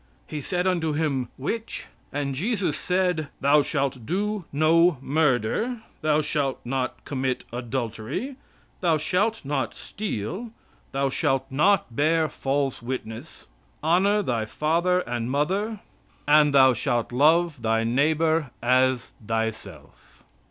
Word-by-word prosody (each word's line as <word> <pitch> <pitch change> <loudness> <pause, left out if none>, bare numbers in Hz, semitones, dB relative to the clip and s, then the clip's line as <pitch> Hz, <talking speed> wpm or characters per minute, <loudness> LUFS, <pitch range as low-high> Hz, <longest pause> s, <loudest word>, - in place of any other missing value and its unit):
He 150 - -5
said 180 +4 -1
unto 170 -4 +1
Him, 140 -5 -1
'which?' 225 - -4 0.3
And 140 -1 -2
Jesus 185 - -1
said: 180 -4 0
"Thou 145 +2 +5
shalt 140 -4 -1
do 200 - -2
no 160 +2 +4
murder; 150 - 0 0.2
thou 155 0 +3
shalt 145 -3 -1
not 130 +1 -3
commit 130 -2 -2
adultery; 120 - -4 0.4
thou 170 -4 +2
shalt 195 +6 0
not 135 -7 -2
steal; 195 - -5 0.4
thou 135 0 0
shalt 135 0 +1
not 150 - +2
bear 160 +3 +3
false 135 -1 -1
witness; 115 -2 -6 0.4
honor 195 +6 +3
thy 115 - -1
father 170 +9 +1
and 120 -5 -3
mother; 195 - -1 0.5
and, 150 0 +6
thou 130 -2 +6
shalt 120 +1 -1
love 155 +2 +3
thy 115 0 +1
neighbor 155 +5 +2
as 130 0 +2
thyself." 110 0 -5
145 Hz, 120 wpm, -25 LUFS, 130-175 Hz, 0.5 s, and